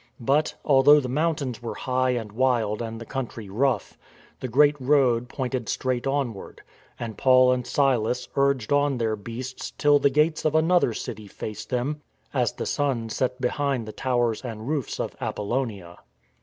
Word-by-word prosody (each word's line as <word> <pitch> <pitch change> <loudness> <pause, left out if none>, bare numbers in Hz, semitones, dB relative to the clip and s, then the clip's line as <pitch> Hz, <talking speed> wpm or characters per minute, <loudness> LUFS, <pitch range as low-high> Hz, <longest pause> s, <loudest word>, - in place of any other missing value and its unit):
But, 140 +6 +1
although 145 +1 +6
the 130 - -3
mountains 140 -3 -1
were 120 - -5
high 130 0 0
and 115 -4 -2
wild 115 -2 +1
and 115 -1 -5
the 115 - -8
country 115 -5 -5
rough, 125 +6 -1 0.4
the 130 - -4
great 145 +4 +4
road 125 -3 +3
pointed 130 -4 -3
straight 130 0 -1
onward, 135 -7 -3 0.4
and 115 -3 -6
Paul 130 -1 +6
and 125 -1 -1
Silas 125 -3 +1
urged 140 -3 +1
on 145 -2 +2
their 110 -2 0
beasts 120 +5 -7
till 145 -1 +4
the 140 - +4
gates 150 +3 +1
of 155 0 +1
another 160 -6 +3
city 110 -2 -6
faced 105 +1 -7
them 135 +4 -2 0.3
as 125 -6 +1
the - - -5
sun 130 -6 -1
set 125 +3 -1
behind 130 -2 -1
the - - -5
towers 120 -4 0
and 115 -2 -6
roofs 145 -4 -2
of - - -3
Apollonia. 105 -6 -3
125 Hz, 165 wpm, -25 LUFS, 115-140 Hz, 0.4 s, although